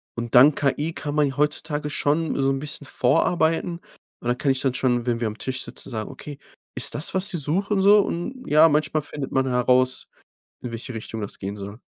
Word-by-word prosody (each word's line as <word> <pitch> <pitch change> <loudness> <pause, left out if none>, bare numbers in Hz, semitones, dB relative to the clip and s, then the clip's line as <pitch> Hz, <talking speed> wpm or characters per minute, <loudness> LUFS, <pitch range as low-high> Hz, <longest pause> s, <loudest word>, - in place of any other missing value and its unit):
Und 120 0 -4
dank 135 +4 +7
KI 145 +3 0
kann 145 0 -5
man 145 -3 +2
heutzutage 150 0 -1
schon 150 +2 0
so 135 - +2
'n 135 - -1
bisschen 145 0 -6
vorarbeiten. 165 +6 +1 0.4
Und - - -6
dann 120 +1 +1
kann 140 - +1
ich 135 - -1
dann 130 -2 +1
schon, 120 -2 0
wenn 120 -1 0
wir 115 - 0
am 110 +1 -6
Tisch 130 0 -4
sitzen, - - -9
sagen: 110 -4 -4
„Okay, 145 -2 -9 0.4
ist 125 - -1
das, 150 +3 -2
was 190 +2 0
Sie 175 - -3
suchen 190 +7 0
so?" 205 +2 +7
Und 250 +8 -3
ja, 155 +2 +6
manchmal 150 +1 +1
findet 145 -1 -6
man 130 0 +1
heraus, 125 +1 +2 0.6
in 120 - -5
welche 115 +2 -6
Richtung 110 0 -6
das 100 - -6
gehen 100 +1 -5
soll. 100 +4 -8
140 Hz, 210 wpm, -24 LUFS, 125-155 Hz, 0.6 s, dank